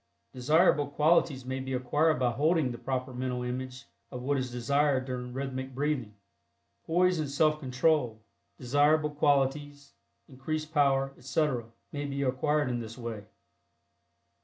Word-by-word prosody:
Desirable 150 +3 +3
qualities 150 -2 +2
may 130 +1 -3
be 130 0 -4
acquired 145 +5 +2
by 125 -1 +1
holding 150 +1 +1
the 120 - -7
proper 130 -1 -3
mental 125 0 -3
image 130 +1 -5 0.2
of 125 -2 -7
what 140 +2 +1
is 130 -2 -2
desired 130 +2 +1
during 125 -1 -5
rhythmic 130 0 -5
breathing. 135 -7 -2 0.7
Poise 180 +1 +3
and 150 -3 -2
Self 150 +2 +2
Control, 130 -3 +1 0.4
desirable 145 +4 +2
qualities; 145 0 0 0.3
increased 155 +4 -5
power, 135 -2 +2
etc., 135 -3 -1 0.3
may 145 0 -4
be 140 0 -2
acquired 145 +3 +1
in 120 -1 -1
this 115 0 -8
way. 115 -4 -6
135 Hz, 135 wpm, -29 LUFS, 125-150 Hz, 0.7 s, Desirable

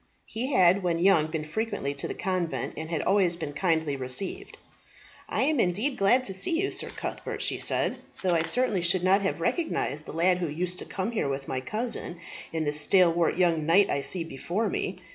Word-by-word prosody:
He 235 +4 -4
had 185 -4 +5
when 175 -2 0
young 170 -3 +4
been 155 -1 -3
frequently 160 -5 -3
to 140 - -4
the - - -5
convent, 185 -3 -2
and 160 +1 -6
had 165 -2 -1
always 190 -3 +2
been 150 -4 -5
kindly 160 -3 0
received. 130 +8 -3 0.7
"I - - 0
am 300 0 +1
indeed 215 +9 +1
glad 220 +6 +3
to 195 - -3
see 195 - +1
you, 390 - 0
Sir - - 0
Cuthbert," - - -5
she - - 0
said, - - 0 0.3
"though 185 -2 +2
I 165 - +3
certainly 200 +3 +1
should 175 +1 +2
not 190 +2 +4
have 195 -4 -1
recognized 165 - -1
the - - -6
lad 180 +3 +2
who 175 - -1
used 180 +4 -3
to - - -6
come 195 +4 -3
here 215 -11 -1
with 135 0 -4
my 130 - -2
cousin, 215 - -3 0.3
in 160 -1 -1
the 145 -1 -1
stalwart 170 +2 +3
young 165 -4 +2
knight 190 +4 +4
I 140 - 0
see 170 +4 -2
before 170 - -2
me. 400 +1 -3
180 Hz, 205 wpm, -27 LUFS, 160-200 Hz, 0.7 s, had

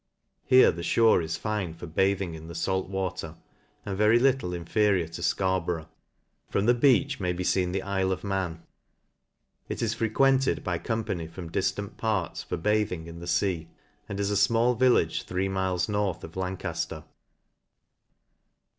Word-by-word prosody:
Here 130 0 +7
the 85 - -7
fhore 110 +1 +4
is 80 0 -3
fine 105 -6 -3
for 85 - -8
bathing 95 +1 0
in 80 0 -9
the 85 - -8
fait 95 +3 0
water, 90 -4 -3 0.5
and 100 - -3
very 105 +3 +4
little 130 -6 +2
inferior 90 +1 +1
to 85 - -8
Scarborough. 90 -4 0 0.6
From 100 - 0
the 120 - +5
Beech 135 +2 +3
may 90 -2 0
be 90 +1 -3
feen 90 -1 +1
the 95 - -1
IJle 95 -1 0
of 95 - -3
Man. 95 -5 -2 1.1
It - - -3
is 110 -1 0
frequented 130 +4 +2
by 90 -2 -1
company 105 -8 -3
from 85 0 -9
difrant 95 +2 -2
parts 105 -7 -1
for - - -4
bathing 105 -2 0
in 85 0 -9
the 85 - -8
fea, 90 -2 0 0.4
and 100 -1 -4
is 100 0 0
a 100 0 +3
fmall 120 +2 +3
village 120 -11 +3
three 95 +1 -2
miles 95 -2 0
north 105 -4 -1
of 80 - -8
Lancajler. 95 0 -4
95 Hz, 160 wpm, -27 LUFS, 85-105 Hz, 1.1 s, Here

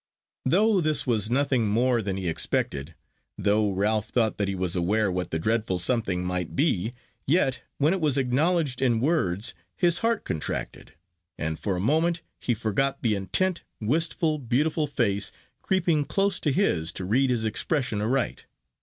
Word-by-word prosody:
Though 200 +7 +3
this 155 -2 +1
was 110 -4 +1
nothing 130 -3 +1
more 120 +3 +2
than 95 -2 -3
he 95 -2 -3
expected, 80 -2 -1 0.4
though 105 +1 +2
Ralph 105 +2 0
thought 115 -4 0
that 100 - +1
he 95 - -2
was 90 -1 -1
aware 100 +3 +1
what 90 0 -3
the 80 - -1
dreadful 110 +1 0
something 90 -2 0
might 90 -2 -3
be, 120 - 0 0.3
yet, 135 -5 +2 0.2
when 150 +5 +3
it 190 - -2
was 145 -3 +2
acknowledged 140 +2 +1
in 120 -4 +2
words, 115 - 0 0.2
his 175 - +3
heart 230 -1 0
contracted, 80 - -4 0.4
and 80 0 -3
for 100 -3 -1
a - - -2
moment 160 - +1 0.2
he 120 - 0
forgot 115 +5 -1
the 115 -3 +2
intent, 165 - 0 0.2
wistful, 155 +5 +1
beautiful 150 +5 0
face, 100 -8 0 0.3
creeping 170 -6 +1
close 195 +5 +1
to 150 - 0
his 90 - +1
to 90 - -4
read 130 +7 +2
his 120 -3 0
expression 115 0 0
aright. 125 +4 -1
120 Hz, 165 wpm, -26 LUFS, 100-150 Hz, 0.4 s, Though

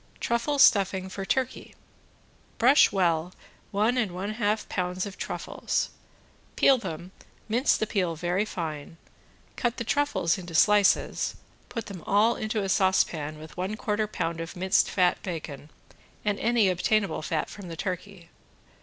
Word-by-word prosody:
~TRUFFLE 235 +5 0
STUFFING 190 -6 +4
FOR 195 0 -5
TURKEY~ 260 +4 -2 0.8
Brush 260 +5 +6
well 175 -3 +1 0.4
one 220 +5 +1
and 210 -7 -1
one 190 +4 -3
half 215 -1 -1
pounds 180 0 -2
of 200 -1 -7
truffles, - - -3 0.6
peel 270 -2 +5
them, 180 -3 -6 0.4
mince 240 +5 +2
the - - 0
peel 185 -6 -1
very 175 +4 0
fine, 165 -6 -6 0.6
cut 240 -1 -1
the - - -2
truffles 240 - +1
into 175 -2 -8
slices, 205 +3 +3 0.3
put 230 - -5
them 195 -4 -8
all 215 +4 +4
into 215 -1 -2
a - - -2
saucepan 175 -6 +1
with 155 0 -11
one 190 +4 -3
quarter 210 0 -1
pound 165 -5 -3
of 165 +3 -7
minced 190 +2 +2
fat 180 -2 +2
bacon 155 -5 -6 0.6
and 205 -1 0
any 235 -3 +3
obtainable 190 0 +1
fat 155 0 -2
from 200 -3 -10
the 165 -1 -7
turkey. 180 0 -5
195 Hz, 145 wpm, -27 LUFS, 175-215 Hz, 0.8 s, Brush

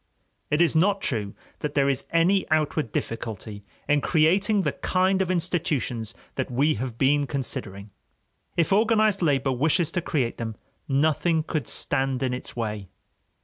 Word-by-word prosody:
It 150 +3 +2
is 170 - +2
not 195 +5 +3
true 105 -5 -1 0.2
that 150 -1 -4
there 140 -1 +3
is 135 -1 0
any 180 +4 +2
outward 155 -5 0
difficulty 110 -3 -5 0.2
in 145 0 +3
creating 190 +7 +3
the - - +1
kind 190 +1 +1
of 185 - -1
institutions 160 - -1 0.2
that - - -3
we 140 +5 +2
have 120 +1 -5
been 140 +2 +2
considering. 105 -7 -5 0.7
If 170 +2 +2
organized 215 -1 +3
labor 140 -5 +2
wishes 160 +6 +1
to 175 - -1
create 135 -8 -1
them, 110 -2 -4 0.3
nothing 155 +3 +2
could 155 -6 -3
stand 135 -1 0
in 130 -1 0
its 125 - -6
way. 105 -4 -3
145 Hz, 150 wpm, -25 LUFS, 125-170 Hz, 0.7 s, not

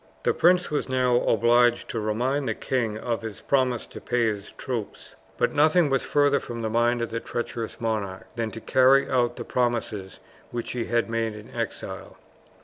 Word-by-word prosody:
The - - +2
prince 180 0 +3
was 145 -2 -1
now 125 -1 +3
obliged 120 +1 +3
to 115 - -2
remind 125 +6 0
the - - -1
king 115 -5 -1
of 115 +1 -2
his 110 -2 -6
promise 130 -4 +1
to - - -11
pay 120 -1 +1
his 105 -2 -3
troops; 120 -6 -6 0.2
but - - +1
nothing 155 +1 +4
was 135 - +2
farther 145 -1 +2
from 115 -1 -6
the 110 - -1
mind 120 +1 +2
of 115 - -4
the 115 - -2
treacherous 120 -1 -5
monarch 105 -5 -2
than 115 -2 -2
to 115 +2 -9
carry 135 +1 +4
out 125 -2 +1
the - - -6
promises 115 -6 -2 0.3
which 120 -1 -4
he 120 -2 -2
had 120 -1 +1
made 115 -1 -1
in 105 0 -11
exile. - - -5
120 Hz, 185 wpm, -25 LUFS, 115-130 Hz, 0.3 s, nothing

